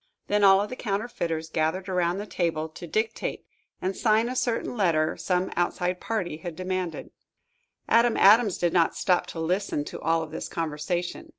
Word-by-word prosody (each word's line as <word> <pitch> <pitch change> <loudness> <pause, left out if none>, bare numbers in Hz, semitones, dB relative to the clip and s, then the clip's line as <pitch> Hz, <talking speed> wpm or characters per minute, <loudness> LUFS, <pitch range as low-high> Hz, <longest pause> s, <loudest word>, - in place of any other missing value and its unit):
Then 205 0 +1
all 195 -1 +7
of 205 +1 -1
the - - -4
counterfeiters 195 -8 -3
gathered 165 +4 -1
around 180 0 0
a 205 - -4
table, 165 -5 -1
to 170 +2 -10
dictate 220 +6 -2 0.4
and 190 +1 -1
sign 220 +1 +2
a 255 - -4
certain 240 -1 -1
letter 165 -7 +2
some 180 0 -1
outside 180 +1 -1
party 195 -9 -2
had 165 0 -7
demanded. 185 -1 -4 0.8
Adam 235 0 +4
Adams 210 0 +6
did 175 -1 0
not 170 -2 +3
stop 180 -2 +1
to 165 - -7
listen 165 -2 -1
to - - -7
all 165 0 +1
of 155 - -9
this - - -5
conversation. 170 - -3
180 Hz, 175 wpm, -26 LUFS, 165-205 Hz, 0.8 s, all